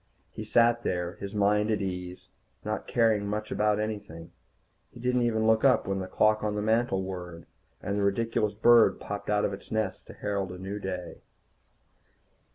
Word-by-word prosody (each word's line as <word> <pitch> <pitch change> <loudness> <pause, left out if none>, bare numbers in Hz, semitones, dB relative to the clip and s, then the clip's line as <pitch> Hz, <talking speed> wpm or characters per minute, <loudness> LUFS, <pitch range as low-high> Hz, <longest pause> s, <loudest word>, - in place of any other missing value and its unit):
He 110 - -7
sat 120 +2 +3
there, 90 -4 -2
his 100 +1 -7
mind 105 +1 +2
at 110 - +1
ease, 90 -1 -5 0.4
not - - -3
caring 110 -3 +2
much 105 +1 -3
about 105 +1 +1
anything. 100 -6 -5 0.6
He 120 - -14
didn't 125 +1 +1
even 110 -2 +1
look 110 0 +3
up 135 -2 +4
when 95 0 -2
the 95 - -4
clock 110 +3 +2
on 105 -1 -1
the 105 - -1
mantel 110 -3 +1
whirred, 90 -3 -7 0.4
and 100 +1 -1
the - - 0
ridiculous 105 +1 0
bird 120 +2 +5
popped 100 0 -6
out 105 0 +2
of 100 - -2
its 100 - -10
nest 110 -4 -2
to - - -10
herald 100 -3 -3
a 90 - -8
new 95 +3 -5
day. 90 -3 -6
105 Hz, 180 wpm, -28 LUFS, 95-110 Hz, 0.6 s, bird